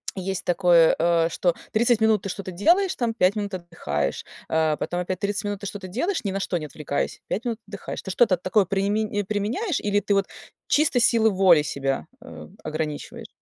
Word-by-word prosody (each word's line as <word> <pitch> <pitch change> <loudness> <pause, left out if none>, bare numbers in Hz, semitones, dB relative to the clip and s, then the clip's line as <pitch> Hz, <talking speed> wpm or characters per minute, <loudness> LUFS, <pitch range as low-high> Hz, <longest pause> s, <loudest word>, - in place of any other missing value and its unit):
есть 190 -1 -4
такое, 175 -2 +4
э, 165 0 +3
что 175 +1 +1 0.2
30 235 +1 +3
минут 220 -2 +3
ты 195 - -4
что-то 190 0 -5
делаешь 345 - +3
там, 235 -2 -1
5 190 -2 +2
минут 205 -1 -3
отдыхаешь, 160 - -3 0.3
э, 160 -1 +2
потом 175 0 -2
опять 180 0 -3
30 200 +1 -2
минут 205 -1 -3
ты 200 - -8
что-то 195 -1 -7
делаешь, 260 - -2
ни 200 - -1
на 195 - -2
что 185 -2 -1
не 155 - -5
отвлекаясь, 145 0 -3
5 215 - -2
минут 235 -2 -1
отдыхаешь. 200 -1 -7
Ты - - -8
что-то 195 -3 +3
такое 185 +4 +2
приме 205 +2 0
применяешь 215 - -1
или 205 0 +1
ты 205 +1 0
вот 195 -1 +2 0.4
чисто 290 -4 +3
силы 230 -1 +4
воли 185 -6 +5
себя, 135 -2 -2 0.2
э, 260 - -10 0.2
ограничиваешь? 155 -1 -5
195 Hz, 190 wpm, -24 LUFS, 175-215 Hz, 0.4 s, воли